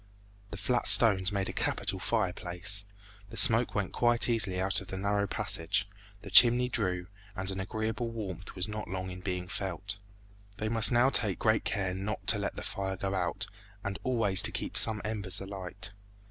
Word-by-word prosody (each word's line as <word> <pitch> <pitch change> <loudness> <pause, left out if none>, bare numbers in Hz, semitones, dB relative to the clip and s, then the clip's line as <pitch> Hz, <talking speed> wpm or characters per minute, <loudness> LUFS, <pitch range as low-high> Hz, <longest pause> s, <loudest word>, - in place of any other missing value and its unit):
The 100 - -8
flat 120 +5 -1
stones 100 -5 +7
made 100 -1 -2
a - - -5
capital 95 - -2
fireplace. 95 -1 -2 0.4
The - - -10
smoke 115 +2 +4
went 100 -3 -2
quite 120 -1 +1
easily 110 -6 +3
out 95 +1 0
at 95 - -12
the 95 - -6
narrow 100 +1 -1
passage, 85 +2 -1 0.4
the 100 - -10
chimney 125 +3 +6
drew, 90 -7 -1 0.3
and 95 0 -3
an 95 - -5
agreeable 110 +4 -4
warmth 100 -6 -7
was 90 0 -2
not 105 0 -6
long 95 0 -5
in 90 - -8
being 90 -1 -4
felt. 100 +1 -4 0.6
They 110 +1 -3
must 115 +1 +5
now 120 +3 +3
take 105 -8 +1
great 110 0 0
care 100 -4 -2
not 100 +3 -5
to - - +2
let - - -3
the - - -7
fire 95 -1 -4
go 95 +1 -3
out, 95 +3 -2 0.4
and 100 -1 -5
always 115 -7 +5
to - - +4
keep - - -5
some 110 -2 +4
embers 105 -3 -3
alight. 100 +1 -8
100 Hz, 185 wpm, -29 LUFS, 95-110 Hz, 0.6 s, stones